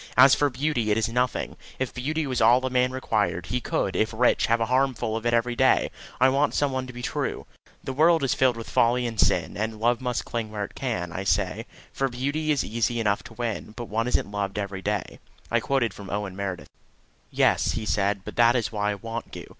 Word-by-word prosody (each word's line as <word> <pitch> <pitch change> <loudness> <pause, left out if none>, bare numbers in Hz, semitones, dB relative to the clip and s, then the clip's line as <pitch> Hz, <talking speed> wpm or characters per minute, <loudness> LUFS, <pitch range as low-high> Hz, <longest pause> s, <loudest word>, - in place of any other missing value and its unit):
As 130 +2 +8
for 145 - +3
beauty, 130 -4 -1
it 105 - +2
is 110 - +1
nothing. 125 +2 -1 0.2
If 130 -1 -3
beauty 150 +5 -2
was 130 -3 -1
all 120 +3 +5
a 130 - -2
man 125 0 +2
required, 110 -8 -1
he 125 +1 -2
could, 95 - -1
if 110 - +1
rich, 120 +2 +2
have 115 0 +2
a 115 - +1
harem 130 +2 +2
full 110 -1 -2
of 115 +1 -2
it 120 - +1
any 120 +1 0
day. 130 +2 +3 0.3
I 130 - +6
want 140 +2 +2
some 145 -1 +1
one 130 -1 -3
to - - -7
be 120 0 -8
true." - - -3 0.4
"The 135 - -4
world 160 +3 +4
is 135 - +2
filled 130 -3 +2
with 115 - -7
folly 120 +1 +2
and 115 -3 -4
sin, - - +2
And 110 +2 -3
love 120 +2 +2
must 125 -2 -2
cling 115 -2 -3
where 105 -1 -4
it - - -13
can, 110 -10 -3
I 95 - -4
say; 100 +3 0 0.3
For 135 0 0
beauty 140 +5 -2
is 145 -3 +2
easy 115 +1 -1
enough 105 -3 +1
to 120 - -11
win, 115 -2 -4
But 120 -3 -6
one 115 +3 0
isn't 125 - 0
loved 100 -1 -3
every 100 -2 -4
day," 105 +1 -3 0.3
I 120 - +3
quoted 120 -3 0
from 100 0 -10
Owen 100 -2 -3
Meredith. 95 -2 -5 0.6
"Yes," - - +2
he 110 - -3
said, 100 -1 0
"that 120 +1 +3
is 115 -4 0
why 105 -1 -1
I 105 - -1
want 115 +3 -6
you. - - -7
115 Hz, 235 wpm, -25 LUFS, 105-130 Hz, 0.6 s, As